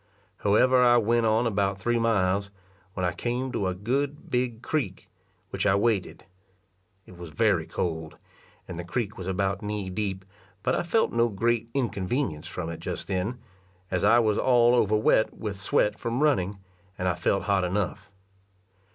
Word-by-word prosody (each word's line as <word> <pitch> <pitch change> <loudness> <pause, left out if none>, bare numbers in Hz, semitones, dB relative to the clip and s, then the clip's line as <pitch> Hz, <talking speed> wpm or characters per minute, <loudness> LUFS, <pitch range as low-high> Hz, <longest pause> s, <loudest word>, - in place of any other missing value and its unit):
However 125 +6 +4
I 120 0 +6
went 115 0 +2
on 110 +2 +2
about 100 -3 0
three 120 +4 +1
miles, 100 -3 +1 0.5
when 90 - -1
I 90 - +1
came 125 +7 -3
to 100 -6 -1
a 90 - -2
good 135 +9 -2
big 125 -1 -1
creek, 125 -12 -2 0.4
which - - -1
I 95 - +4
waded. 105 -2 0 0.8
It 90 - -15
was 85 -2 -8
very 75 - +1
cold, 80 -3 -3 0.5
and 90 -2 -7
the - - -4
creek 110 +3 -3
was 95 - -7
about 95 +2 -1
knee 105 -3 -4
deep; 95 -1 -3 0.4
but 125 - +1
I - - +1
felt 220 +6 +1
no 115 0 +3
great 115 +3 0
inconvenience 115 - -1
from 85 -2 -5
it 85 - -7
just - - -5
then, 95 +6 -2 0.5
as 90 -1 0
I 110 +3 +6
was 110 -3 +2
all 120 -2 +4
over 110 -3 +3
wet 110 0 +2
with 100 -3 -5
sweat 105 +2 +1
from 120 +5 -1
running, 100 -10 +1 0.4
and 90 - -1
I 90 - +2
felt 90 +3 0
hot 100 -2 +1
enough. 95 +1 -2
105 Hz, 170 wpm, -26 LUFS, 95-120 Hz, 0.8 s, I